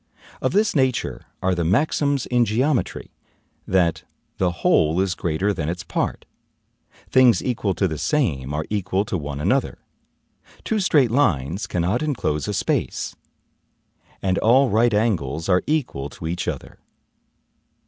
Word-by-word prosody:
Of - - 0
this 210 -1 +2
nature 130 -4 0 0.2
are 95 0 +2
the 85 -1 -1
maxims 140 - +1
in 120 -1 +2
geometry, 125 +5 -1 0.6
that 90 -3 +2 0.4
"the 95 - +2 0.2
whole 80 +3 +3
is 95 -1 +1
greater 90 +3 -1
than 80 -4 -3
its 90 +1 -4
part; - - -3 0.8
things 125 -6 +4
equal 110 -6 -1
to 95 +4 +1
the 80 -4 -4
same 75 - 0
are 75 +1 -2
equal 100 -1 0
to 100 - -3
one 70 -4 -4
another; 115 - 0 0.9
two 220 - 0
straight 145 - +3
lines 95 - +1
cannot 90 +7 0
enclose 75 - -1
a - - -2
space; - - -1 1.1
and 95 -1 +1
all 130 +3 +4
right 115 +3 +3
angles 80 - 0
are 90 -2 +3
equal 125 - -1
to 80 - -10
each 85 +2 -3
other." - - -5
95 Hz, 140 wpm, -22 LUFS, 85-125 Hz, 1.1 s, things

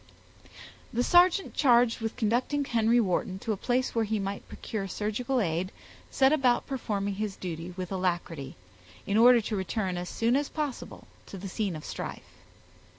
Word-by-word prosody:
The 240 +2 +1
sergeant 355 +5 +4
charged 245 -4 +4
with 225 -1 -3
conducting 255 +5 0
Henry 230 -1 +3
Wharton 185 -2 0
to 220 +3 -3
a - - +1
place 250 +5 0
where 230 - +1
he 220 0 -1
might 200 0 -4
procure 200 -3 -5
surgical 220 +7 -1
aid, 180 -1 -1 0.4
set 265 +2 +4
about 255 -5 +2
performing 205 -7 -2
his 205 0 -3
duty 175 0 -6
with 185 0 -5
alacrity, 175 -7 -2 0.5
in 200 - -1
order 240 +2 +7
to 215 0 -3
return 190 -1 -2
as 175 0 -4
soon 230 +2 +1
as 285 +1 0
possible 295 -5 -5 0.2
to 195 - -8
the 195 +2 -6
scene 195 -2 -2
of 155 - -8
strife. - - -6
215 Hz, 165 wpm, -28 LUFS, 190-245 Hz, 0.5 s, order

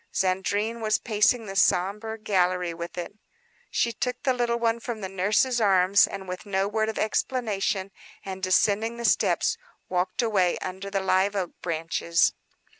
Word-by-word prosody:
Zandrine 200 +5 0
was 215 -1 +2
pacing 220 +1 +1
the 195 -1 -7
sombre 205 +5 +1
gallery 180 -4 0
with 170 +1 -7
it. 175 - -5 0.6
She 235 - +1
took 250 +2 -4
the 260 - +2
little 240 -1 0
one 230 0 0
from 230 -2 -5
the 190 - -3
nurse's 210 +6 +1
arms 195 -1 +5
with 185 -2 -6
no 195 -1 0
word 220 +1 0
of 220 - -4
explanation, 210 -4 -1 0.3
and 190 -1 -6
descending 205 +4 +2
the 235 - -4
steps, - - +2 0.3
walked 185 +5 0
away, 195 -6 +2
under 190 +2 -6
the 195 -1 -1
live 190 +2 +2
oak 185 -3 -2
branches. 165 0 +1
200 Hz, 155 wpm, -26 LUFS, 185-225 Hz, 0.6 s, arms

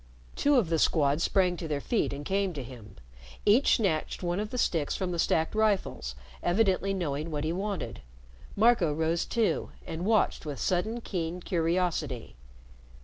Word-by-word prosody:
Two 290 0 +3
of 225 -10 +3
the 165 -1 +1
Squad 145 -1 +2
sprang 180 -1 +2
to 165 - -5
their 150 -2 -1
feet 225 - 0
and 140 +1 -6
came 195 0 0
to 140 -4 -5
him. 115 -5 -11 0.5
Each 225 +7 +5
snatched 185 -6 -1
one 175 +2 -1
of 210 0 -3
the 250 - -5
sticks 165 -10 0
from 185 -2 -2
the 170 - -3
stacked 160 0 +1
rifles, 205 - 0 0.3
evidently 195 +1 +2
knowing 160 -5 -2
what 150 -2 -3
he 160 +1 -1
wanted. 185 - -4 0.5
Marco 215 -6 +4
rose 160 +2 0
too, 230 -3 0 0.2
and 165 +1 -5
watched 215 +2 +2
with 145 -4 -5
sudden, 215 +6 0
keen 175 -4 -3
curiosity. 165 -7 -1
175 Hz, 165 wpm, -29 LUFS, 155-200 Hz, 0.5 s, Each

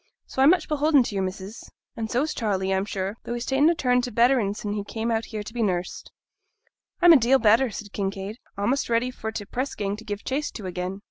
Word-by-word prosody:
So 265 - -3
I'm 275 - +7
much 355 -1 +3
beholden 300 -2 +3
to 225 - -5
your 195 -1 0
missus, 190 +3 -6 0.3
and 225 -1 -4
so's 285 +7 0
Charley, 195 -4 -1
I'm 190 +1 0
sure; 195 +1 -4
though 240 - -4
he's 240 0 -4
ta'en 275 +4 +3
a 340 - +2
turn 250 -5 +2
to 245 0 -4
betterin' 235 -4 +3
sin' 205 -1 -4
he 205 -1 -3
came 225 +3 -3
out 225 0 0
here 215 -2 -5
to 215 - -10
be 240 - -2
nursed.' 180 -4 -2 0.9
'I'm 350 -1 +9
a - - +8
deal 255 +2 +4
better,' 230 +2 +4
said 205 -1 -8
Kinraid; 195 +1 -3 0.2
'a'most 240 +8 0
ready 235 +2 +1
for 220 -3 -5
t' 210 -2 -5
press 255 +6 -3
gang 200 -1 -2
to 225 - -11
give 205 -1 -5
chase 285 +3 -2
to 210 - -7
again.' 185 +1 -4
225 Hz, 240 wpm, -25 LUFS, 200-255 Hz, 0.9 s, I'm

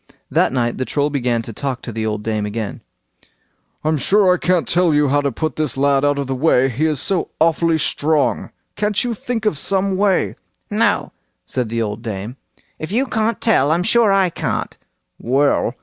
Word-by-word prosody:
That - - +2
night 120 -2 -1
the - - 0
Troll 145 +2 -1
began 120 -4 0
to 115 - -8
talk 135 +1 -4
to 120 - -6
the 110 0 -3
old 105 -1 -3
dame 110 -1 -1
again. 105 0 -4 1.0
"I'm 155 -1 +1
sure 190 +5 +4
I - - 0
can't 180 -2 +1
tell 175 -1 +3 0.2
how 145 +1 +2
to 140 -1 -1
put 155 +6 -3
this 150 -5 -1
lad 140 0 +2
out 145 0 +2
of 140 - -2
the 135 - -3
way—he 135 0 +2
is 150 -4 -1
so 190 +3 0
awfully 165 0 +2
strong; 150 0 0 0.3
can't 210 0 0
you 245 -1 -1
think 225 0 -4
of 170 -10 +1
some 195 +1 0
way? 195 -2 +1 0.3
"No," - - +1 0.3
said 125 -4 -3
the 115 0 -1
old 105 +1 -4
dame, 110 +2 -6 0.4
"if 155 - -6
you 250 +6 +1
can't 220 -3 -1
tell, 175 - +3
I'm 170 +2 +1
sure 225 +1 +3
I 195 -2 +3
can't." - - -3 0.4
"Well!" 135 -1 +1
145 Hz, 190 wpm, -19 LUFS, 125-185 Hz, 1.0 s, sure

